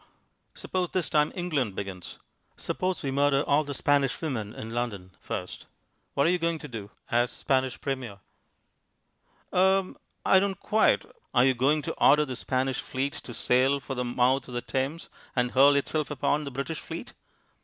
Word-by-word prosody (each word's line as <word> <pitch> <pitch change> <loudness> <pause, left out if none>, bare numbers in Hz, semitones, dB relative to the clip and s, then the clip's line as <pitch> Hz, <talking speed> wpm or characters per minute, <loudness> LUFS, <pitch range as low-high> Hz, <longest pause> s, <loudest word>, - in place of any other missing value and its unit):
"Suppose 180 -2 -2
this 180 -4 0
time 150 0 +3
England 150 - -1
begins. 95 -3 -6 0.4
Suppose 185 -1 -2
we 135 - -1
murder 140 0 +3
all 145 +2 +3
the 145 -1 -5
Spanish 140 -1 +2
women 120 -10 -3
in 110 +1 -7
London 105 -6 -3
first. - - -6 0.5
What 140 - +3
are 170 - +4
you 180 - +1
going 170 0 0
to 150 - -8
do 110 -6 -7 0.2
as 120 +1 +3
Spanish 130 -1 0
Premier?" 130 -7 -4 1.4
"Er 190 +1 +3 0.3
I 190 - +6
don't 195 0 -1
quite 215 +1 +3
" - - -41
"Are 125 0 +6
you 135 - +4
going 140 +5 +2
to - - -3
order 150 +2 +6
the 130 -3 -5
Spanish 130 +1 -1
Fleet 135 +2 -2
to 120 - -8
sail 130 +3 +3
for 135 0 -6
the 125 -1 -2
mouth 125 +2 +1
of 125 - -8
the 120 - -1
Thames, 135 +6 -2 0.3
and 125 -1 +1
hurl 140 +2 +6
itself 150 +2 0
upon 145 +1 0
the 140 - -5
British 140 +4 -4
fleet?" - - -7
135 Hz, 175 wpm, -27 LUFS, 125-150 Hz, 1.4 s, I